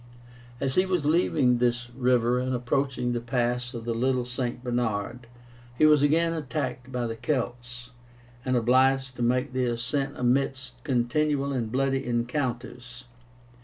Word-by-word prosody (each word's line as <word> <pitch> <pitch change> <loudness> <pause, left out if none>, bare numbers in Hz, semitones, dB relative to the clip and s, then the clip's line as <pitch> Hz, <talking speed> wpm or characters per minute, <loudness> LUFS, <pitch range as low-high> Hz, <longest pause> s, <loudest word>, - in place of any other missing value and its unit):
As 135 -1 0
he 185 - +3
was 180 -5 0
leaving 150 -6 +3
this 120 0 0
river 125 -1 +2
and 130 0 -1
approaching 125 0 -1
the 120 - -1
pass 120 +1 -1
of 115 -1 -6
the 120 - -1
Little 125 +1 0
St. 125 0 -4
Bernard, 120 -1 -2 0.5
he 155 - +5
was 150 -2 +6
again 165 +3 +3
attacked 130 -5 -4
by 125 -1 -2
the 115 -1 -3
Celts, 125 -1 -4 0.5
and 130 -1 +1
obliged 130 +2 +2
to - - -5
make 125 +3 +1
the 130 -1 +1
ascent 125 +4 -2
amidst 125 0 -1
continual 140 +3 0
and 115 -4 -2
bloody 135 +1 0
encounters. 125 0 -3
125 Hz, 145 wpm, -27 LUFS, 120-135 Hz, 0.5 s, was